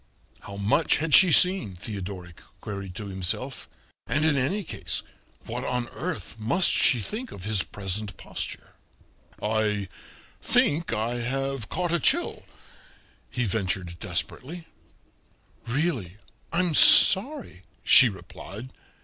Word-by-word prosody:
How 100 Hz, -, -11 dB
much 105 Hz, +11 st, +1 dB
had 155 Hz, 0 st, -3 dB
she 185 Hz, -3 st, +7 dB
seen, 180 Hz, -, +2 dB
Theodoric 90 Hz, -2 st, -8 dB, 0.2 s
queried 100 Hz, -3 st, -8 dB
to 105 Hz, -, -6 dB
himself; 95 Hz, +8 st, -4 dB, 0.4 s
and 150 Hz, +1 st, 0 dB
in 155 Hz, -2 st, +2 dB
any 160 Hz, +11 st, -1 dB
case -, -, -3 dB, 0.4 s
what -, -, -6 dB
on 125 Hz, -1 st, -3 dB
earth 115 Hz, -, -7 dB
must 170 Hz, -, +1 dB
she 125 Hz, -, +2 dB
think 220 Hz, -, -6 dB
of 90 Hz, -, -11 dB
his 105 Hz, -1 st, 0 dB
present 100 Hz, +1 st, -5 dB
posture? -, -, -7 dB, 0.7 s
"I 105 Hz, -2 st, -1 dB, 0.5 s
think 160 Hz, +3 st, +1 dB
I 115 Hz, +2 st, -2 dB
have 135 Hz, -1 st, -4 dB
caught 180 Hz, -2 st, -3 dB
a 170 Hz, -, +1 dB
chill," 345 Hz, -, 0 dB, 0.9 s
he 125 Hz, -, -3 dB
ventured 95 Hz, -4 st, -3 dB
desperately. 125 Hz, -, -5 dB, 1.0 s
"Really, 120 Hz, -, -3 dB, 0.3 s
I'm 175 Hz, -1 st, 0 dB
sorry," 205 Hz, -, +7 dB, 0.2 s
she 130 Hz, -2 st, +7 dB
replied. 100 Hz, +3 st, -11 dB
115 Hz, 120 wpm, -25 LUFS, 100-155 Hz, 1.0 s, she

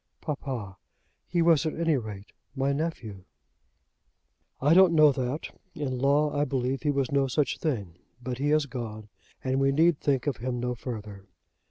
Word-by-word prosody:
"Papa, 130 Hz, -, -5 dB, 0.5 s
he 170 Hz, -1 st, +1 dB
was 165 Hz, -3 st, +4 dB
at 155 Hz, -, -2 dB
any 165 Hz, -2 st, +2 dB
rate 105 Hz, -5 st, -6 dB, 0.2 s
my 135 Hz, +1 st, +1 dB
nephew." 120 Hz, -, -4 dB, 1.3 s
"I 145 Hz, +4 st, +4 dB
don't 180 Hz, -1 st, +6 dB
know 155 Hz, -2 st, +7 dB
that. 130 Hz, +2 st, -4 dB, 0.2 s
In 135 Hz, -5 st, -3 dB
law, 145 Hz, +3 st, +2 dB
I 145 Hz, -, +2 dB
believe, 135 Hz, -2 st, -1 dB
he 150 Hz, -, 0 dB
was 135 Hz, -3 st, 0 dB
no 140 Hz, -1 st, +2 dB
such 135 Hz, +1 st, 0 dB
thing. 100 Hz, -, -3 dB, 0.2 s
But 125 Hz, 0 st, -5 dB
he 145 Hz, +1 st, 0 dB
has 155 Hz, 0 st, +3 dB
gone, 110 Hz, -5 st, -7 dB, 0.3 s
and 130 Hz, 0 st, 0 dB
we 135 Hz, 0 st, +3 dB
need 160 Hz, +2 st, +3 dB
think 135 Hz, -3 st, 0 dB
of 140 Hz, -6 st, -1 dB
him 125 Hz, +1 st, -3 dB
no 125 Hz, 0 st, -1 dB
further." 105 Hz, -5 st, -7 dB
135 Hz, 170 wpm, -27 LUFS, 120-150 Hz, 1.3 s, know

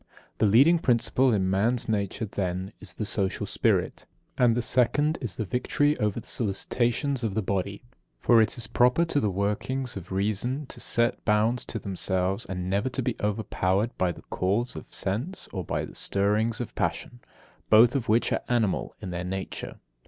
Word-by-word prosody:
The 110 Hz, -, +4 dB
leading 140 Hz, -, +6 dB
principle 125 Hz, -1 st, +2 dB
in 95 Hz, -4 st, +1 dB
man's 115 Hz, +6 st, +1 dB
nature, 105 Hz, 0 st, -1 dB
then, 95 Hz, -1 st, -3 dB
is 90 Hz, -6 st, -7 dB
the 110 Hz, -, -3 dB
social 100 Hz, -2 st, -1 dB
spirit; -, -, 0 dB, 0.3 s
and 120 Hz, -2 st, +3 dB
the -, -, +1 dB
second 145 Hz, +6 st, +2 dB
is 110 Hz, -8 st, -4 dB
victory 135 Hz, -, 0 dB
over 105 Hz, -2 st, 0 dB
the -, -, -12 dB
solicitations 120 Hz, +5 st, 0 dB
of 105 Hz, -4 st, -2 dB
the 110 Hz, -, 0 dB
body. 100 Hz, +2 st, -2 dB, 0.4 s
For 115 Hz, -2 st, +5 dB
it 110 Hz, +2 st, 0 dB
is 120 Hz, -, -2 dB
proper 125 Hz, +9 st, +3 dB
to 155 Hz, -3 st, 0 dB
the 105 Hz, -, +1 dB
workings 105 Hz, +7 st, -1 dB
of 95 Hz, -2 st, -8 dB
reason 110 Hz, +9 st, -1 dB
to -, -, -8 dB
set 115 Hz, 0 st, +1 dB
bounds 110 Hz, +3 st, +1 dB
to -, -, -5 dB
themselves, 95 Hz, 0 st, -1 dB
and 90 Hz, -1 st, -4 dB
never 100 Hz, +7 st, 0 dB
to 130 Hz, +1 st, -3 dB
be 120 Hz, -2 st, -1 dB
overpowered 105 Hz, 0 st, 0 dB
by 90 Hz, -1 st, +2 dB
the -, -, -11 dB
calls 105 Hz, +7 st, -1 dB
of -, -, -9 dB
sense 120 Hz, -, -2 dB
or 95 Hz, -3 st, -3 dB
by -, -, -2 dB
the -, -, -12 dB
stirrings 105 Hz, +3 st, +1 dB
of 120 Hz, -, -5 dB
passion, 120 Hz, -, -3 dB, 0.5 s
both 115 Hz, +4 st, +6 dB
of 130 Hz, -6 st, -2 dB
which 115 Hz, +2 st, +3 dB
are -, -, 0 dB
animal 115 Hz, -6 st, 0 dB
in 90 Hz, -, -5 dB
their 90 Hz, 0 st, -3 dB
nature. 95 Hz, +1 st, -5 dB
110 Hz, 180 wpm, -27 LUFS, 95-125 Hz, 0.5 s, leading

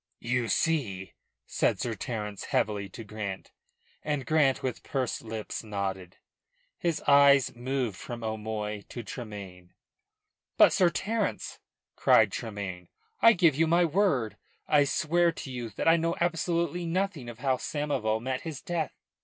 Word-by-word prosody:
"You 125 Hz, 0 st, 0 dB
see?" 105 Hz, -, 0 dB, 0.3 s
said -, -, 0 dB
Sir 120 Hz, -, -2 dB
Terence 105 Hz, -1 st, -5 dB
heavily 100 Hz, -2 st, 0 dB
to 115 Hz, -, -9 dB
Grant, 105 Hz, -2 st, -6 dB, 0.5 s
and 145 Hz, -3 st, -2 dB
Grant, 150 Hz, -4 st, +2 dB
with 130 Hz, -3 st, -3 dB
pursed 130 Hz, -4 st, -2 dB
lips, 110 Hz, 0 st, -5 dB
nodded, 95 Hz, -4 st, -4 dB, 0.6 s
his 170 Hz, -3 st, -1 dB
eyes 140 Hz, -2 st, +6 dB
moving 125 Hz, -1 st, -1 dB
from 115 Hz, +5 st, -8 dB
O'Moy 105 Hz, -1 st, -3 dB
to 120 Hz, -, -6 dB
Tremayne. 100 Hz, -7 st, -9 dB, 0.8 s
"But, -, -, +7 dB
Sir 180 Hz, -2 st, +4 dB
Terence," 215 Hz, +4 st, -2 dB, 0.4 s
cried 110 Hz, -3 st, +5 dB
Tremayne, 100 Hz, -6 st, -5 dB, 0.3 s
"I 230 Hz, -, +8 dB
give 170 Hz, -6 st, +4 dB
you 160 Hz, +2 st, +3 dB
my 170 Hz, +2 st, +4 dB
word 145 Hz, -, +1 dB, 0.3 s
I 145 Hz, -1 st, +5 dB
swear 170 Hz, +4 st, +2 dB
to 135 Hz, -, -7 dB
you 120 Hz, -2 st, -5 dB
that -, -, -2 dB
I 165 Hz, +1 st, +7 dB
know 165 Hz, +1 st, 0 dB
absolutely 170 Hz, 0 st, 0 dB
nothing 175 Hz, -7 st, -1 dB
of 120 Hz, -, -9 dB
how 130 Hz, 0 st, +1 dB
Samoval 135 Hz, -9 st, -1 dB
met 130 Hz, 0 st, -2 dB
his 160 Hz, -4 st, -6 dB
death." 170 Hz, -4 st, -3 dB
125 Hz, 145 wpm, -28 LUFS, 110-160 Hz, 0.8 s, I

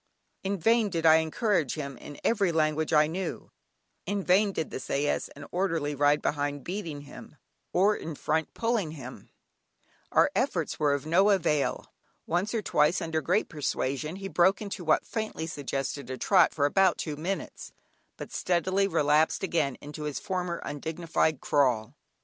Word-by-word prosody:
In 195 Hz, +1 st, -1 dB
vain 225 Hz, +4 st, +3 dB
did 165 Hz, -3 st, -2 dB
I 160 Hz, 0 st, +8 dB
encourage 160 Hz, -, 0 dB
him 140 Hz, -3 st, -5 dB
in 145 Hz, -, -10 dB
every 200 Hz, -6 st, +2 dB
language 155 Hz, -1 st, +1 dB
I 150 Hz, -1 st, +5 dB
knew, 180 Hz, +5 st, -5 dB, 0.6 s
in 200 Hz, -1 st, -1 dB
vain 195 Hz, +3 st, +4 dB
did 160 Hz, -, -3 dB
the -, -, -4 dB
sais 140 Hz, +3 st, -1 dB
and 140 Hz, 0 st, -9 dB
orderly 165 Hz, -5 st, 0 dB
ride 145 Hz, +1 st, +2 dB
behind 145 Hz, -1 st, -1 dB
beating 170 Hz, -6 st, -5 dB
him, 145 Hz, +1 st, -12 dB, 0.4 s
or 200 Hz, +4 st, +3 dB
in 160 Hz, -1 st, -6 dB
front 160 Hz, +2 st, -1 dB
pulling 225 Hz, -9 st, 0 dB
him, 130 Hz, -4 st, -10 dB, 0.8 s
our 295 Hz, -, +4 dB
efforts 190 Hz, -, -1 dB
were 145 Hz, -2 st, +3 dB
of 145 Hz, 0 st, -5 dB
no 185 Hz, +6 st, +4 dB
avail. 155 Hz, -7 st, 0 dB, 0.3 s
Once 180 Hz, +5 st, 0 dB
or 220 Hz, -, -1 dB
twice, 150 Hz, +3 st, +2 dB
under 160 Hz, -3 st, -2 dB
great 185 Hz, +7 st, +1 dB
persuasion, 150 Hz, 0 st, -2 dB
he 195 Hz, 0 st, -6 dB
broke 190 Hz, +1 st, +3 dB
into 200 Hz, -4 st, -6 dB
what 155 Hz, -2 st, +2 dB
faintly 215 Hz, -7 st, -4 dB
suggested 140 Hz, -3 st, -4 dB
a 130 Hz, -, -4 dB
trot, 185 Hz, +2 st, +4 dB
for 145 Hz, -, +1 dB
about 190 Hz, +4 st, +3 dB
two 150 Hz, -, -4 dB
minutes, 175 Hz, +6 st, -5 dB, 0.5 s
but -, -, -8 dB
speedily 185 Hz, +2 st, +1 dB
relapsed 150 Hz, -2 st, +2 dB
again 160 Hz, -8 st, 0 dB
into 150 Hz, +1 st, -7 dB
his 145 Hz, -3 st, -3 dB
former 180 Hz, -3 st, -3 dB
undignified 160 Hz, 0 st, -1 dB
crawl. 125 Hz, -7 st, +1 dB
160 Hz, 160 wpm, -28 LUFS, 145-190 Hz, 0.8 s, I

